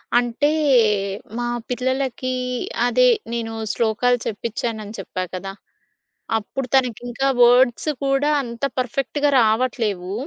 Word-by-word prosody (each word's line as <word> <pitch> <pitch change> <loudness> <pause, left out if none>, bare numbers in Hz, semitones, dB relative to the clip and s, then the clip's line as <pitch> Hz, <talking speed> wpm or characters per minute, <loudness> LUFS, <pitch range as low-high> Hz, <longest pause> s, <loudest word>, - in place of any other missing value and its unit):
అంటే 245 +4 +2 0.9
మా 240 - -2 0.2
పిల్లలకి 260 +1 -2 0.6
అదే 250 +1 +4 0.3
నేను 225 -1 -3 0.2
శ్లోకాలు 235 +2 +1
చెప్పిచ్చానని 220 0 -4
చెప్పా 185 -1 -4
కదా! 195 +1 -5 0.9
అప్పుడు 250 +5 -5
తనకింకా 245 0 0
వర్డ్స్ 245 +3 +5 0.2
కూడా 275 +2 +2
అంత 235 0 -9
పర్ఫెక్ట్‌గా 275 +3 0
రావట్లేవు. 220 -5 0
240 Hz, 95 wpm, -21 LUFS, 225-255 Hz, 0.9 s, వర్డ్స్